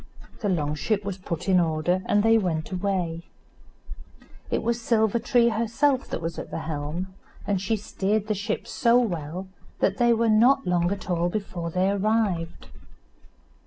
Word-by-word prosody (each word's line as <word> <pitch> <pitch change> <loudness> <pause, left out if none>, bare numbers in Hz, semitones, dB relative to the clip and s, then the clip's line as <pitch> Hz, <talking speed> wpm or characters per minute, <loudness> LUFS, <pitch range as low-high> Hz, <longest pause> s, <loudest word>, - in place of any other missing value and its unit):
The 205 - -1
long 150 -5 0
ship 205 +6 -1
was 195 -1 -4
put 170 -1 -5
in 185 -2 +5
order, 170 +2 +1
and 205 0 +3
they 225 0 +5
went 165 -5 -2
away. 180 -3 -2 1.2
It - - -1
was 235 +1 -1
Silver 225 -1 +2
tree 235 0 +3
herself 235 +5 +1
that 165 - -5
was 165 0 -3
at - - -7
the 165 - -4
helm, 160 +5 -4 0.3
and 195 -3 0
she 200 +3 0
steered 205 +1 -1
the 215 - 0
ship 205 0 -3
so 235 -1 +3
well 180 -5 -2 0.3
that 195 - +1
they 240 -1 +4
were 230 0 +2
not 240 +5 +4
long 175 0 +1
at 200 -2 -4
all 175 -1 +1
before 175 -4 -4
they 185 +3 +1
arrived. 200 -5 -1
195 Hz, 165 wpm, -25 LUFS, 170-220 Hz, 1.2 s, in